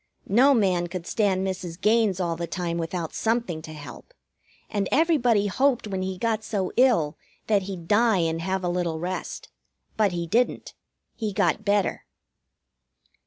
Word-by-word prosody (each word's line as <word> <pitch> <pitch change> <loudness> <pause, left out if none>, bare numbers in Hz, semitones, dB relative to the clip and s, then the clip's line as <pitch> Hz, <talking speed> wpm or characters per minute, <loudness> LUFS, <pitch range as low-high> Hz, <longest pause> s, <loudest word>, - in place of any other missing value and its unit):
No 260 +7 +5
man 185 -6 +2
could 175 -1 -6
stand 195 -3 +1
Mrs. 185 -2 -4
Gaines 210 -2 +2
all 170 -2 -1
the 170 +1 -4
time 170 -2 -3
without 165 0 -3
something 225 -8 -1
to 155 - -9
help, 155 - -11 0.5
and 200 -3 -2
everybody 255 -9 +3
hoped 255 +5 +1
when 190 -3 -3
he 185 0 -3
got 225 0 -1
so 195 -4 -2
ill 225 - +3 0.3
that 210 -2 +2
he'd 175 -4 -7
die 220 +1 +4
and 165 -1 0
have 190 +1 -2
a - - 0
little 175 -2 -1
rest. 180 +2 -5 0.5
But 210 -3 +3
he 170 -1 -3
didn't. 235 +9 0 0.4
He 215 -2 -3
got 205 - +1
better. 205 -2 0
190 Hz, 160 wpm, -25 LUFS, 175-220 Hz, 0.5 s, No